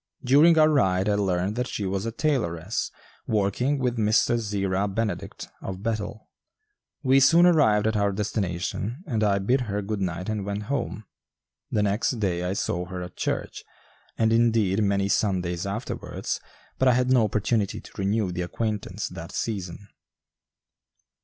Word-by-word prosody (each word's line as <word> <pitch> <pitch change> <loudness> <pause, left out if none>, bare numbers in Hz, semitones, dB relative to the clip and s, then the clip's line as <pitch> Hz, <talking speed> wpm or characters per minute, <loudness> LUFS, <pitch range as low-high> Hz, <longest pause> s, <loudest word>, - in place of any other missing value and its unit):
During 150 +6 +6
our 155 -1 +7
ride 95 -10 +2
I 105 - +3
learned 95 0 0
that 125 0 -1
she 105 - -3
was 95 +3 -2
a - - -2
tailoress, 110 - -1 0.4
working 110 +7 +1
with 125 -2 -1
Mr. 110 +2 +3
Zerah 100 -2 -1
Benedict, 105 +1 -3
of 95 +1 -6
Bethel. 110 -1 -3 0.8
We 135 0 +5
soon 170 +6 +6
arrived 140 -12 +4
at 110 0 +1
our 100 -1 +2
destination 100 - -3
and 115 -9 -1
I 100 -2 +3
bid 120 +7 +1
her 105 -3 -2
good 105 0 -3
night 90 -1 -3
and 110 -2 -2
went 100 +1 -3
home. 105 - -3 0.7
The 105 - +1
next 105 +5 0
day 90 -4 0
I 90 +1 -1
saw 90 -2 -2
her 90 0 -6
at 90 - -9
church, - - -3 0.5
and, 110 0 +3
indeed, 110 -3 +3
many 100 -1 +1
Sundays 90 -3 0
afterwards, 105 +5 -4 0.4
but 130 - +3
I 125 - +6
had 125 +1 +2
no 125 -4 +5
opportunity 105 0 0
to - - -14
renew 100 0 0
the 90 0 -3
acquaintance 105 +4 -3
that - - -8
season. 100 -3 -4
105 Hz, 160 wpm, -25 LUFS, 95-115 Hz, 0.8 s, our